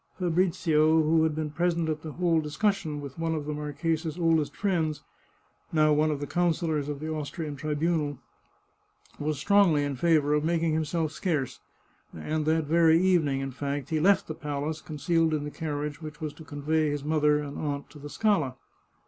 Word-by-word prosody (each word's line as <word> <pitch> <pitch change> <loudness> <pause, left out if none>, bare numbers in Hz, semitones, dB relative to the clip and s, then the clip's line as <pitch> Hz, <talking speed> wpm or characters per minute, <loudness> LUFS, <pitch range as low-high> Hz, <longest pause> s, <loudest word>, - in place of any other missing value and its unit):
Fabrizio, 165 -3 +2
who 160 +1 +3
had 160 -1 +1
been 155 -1 -3
present 170 +1 0
at 155 -1 -2
the 155 -2 -7
whole 170 -2 +2
discussion 155 -1 -1
with 140 +1 -9
one 165 0 0
of 150 -2 -4
the 150 - -3
marchesa's 155 +2 -2
oldest 165 -3 +1
friends, 165 -7 -1 0.7
now 155 -1 +4
one 155 +1 +3
of 150 -2 -1
the 145 - -3
councillors 160 -3 0
of 145 -1 -4
the 155 - -5
Austrian 155 0 -4
Tribunal, 150 0 -1 1.0
was 150 0 -1
strongly 175 -2 +4
in 145 -1 -2
favour 150 0 +3
of 150 0 +2
making 165 0 +1
himself 160 0 -1
scarce, 155 -5 -2 0.6
and 155 - -2
that 160 0 +2
very 165 +1 +4
evening, 165 -7 +2
in 135 0 -4
fact, 140 +1 -4
he 160 - +1
left 195 +5 +4
the 155 - -4
palace, 150 +1 -4
concealed 160 +1 0
in 150 - -2
the 150 - -5
carriage 150 -1 -4
which 155 -1 -8
was 155 -3 -4
to 160 - -12
convey 155 +1 0
his 145 -1 -3
mother 150 -1 +3
and 145 -1 -5
aunt 145 -2 -3
to 150 - -12
the 145 +1 -8
Scala. 160 - +1
155 Hz, 180 wpm, -27 LUFS, 145-165 Hz, 1.0 s, now